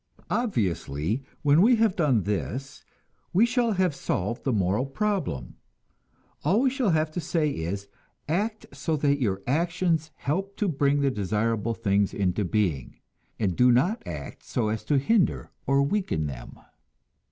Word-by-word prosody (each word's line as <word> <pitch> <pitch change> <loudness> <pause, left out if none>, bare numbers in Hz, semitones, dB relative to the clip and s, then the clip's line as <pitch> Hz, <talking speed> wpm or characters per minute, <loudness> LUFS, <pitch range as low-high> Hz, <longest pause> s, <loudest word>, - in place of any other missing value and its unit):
Obviously, 105 - -1 0.2
when 145 +3 +5
we 240 +5 +6
have 225 -4 +2
done 135 - +2
this, 125 +7 -3 0.5
we 200 +6 +5
shall 240 -2 +1
have 185 -4 +1
solved 115 -3 -2
the 135 - +1
moral 105 +4 +1
problem; 175 - -2 0.9
all 190 +10 +3
we 265 -1 +3
shall 260 -5 0
have 155 -2 +1
to 175 - -3
say 155 -1 0
is, 100 +1 -4 0.4
act 210 +7 -1
so 140 +3 -1
that 145 -1 +1
your 100 -4 0
actions 165 +2 0
help 195 +7 -3
to 210 - 0
bring 145 -3 +2
the 140 -1 +2
desirable 110 +2 -1
things 100 -3 +1
into 100 0 0
being, 90 - -1 0.4
and 95 -5 0
do 125 0 +5
not 175 - +2
act 75 -4 -7
so 115 -4 -1
as 110 0 -2
to 145 - +2
hinder 185 +8 +1 0.2
or 140 0 +4
weaken 140 - 0
them. 65 -4 -7
140 Hz, 150 wpm, -26 LUFS, -, 0.9 s, we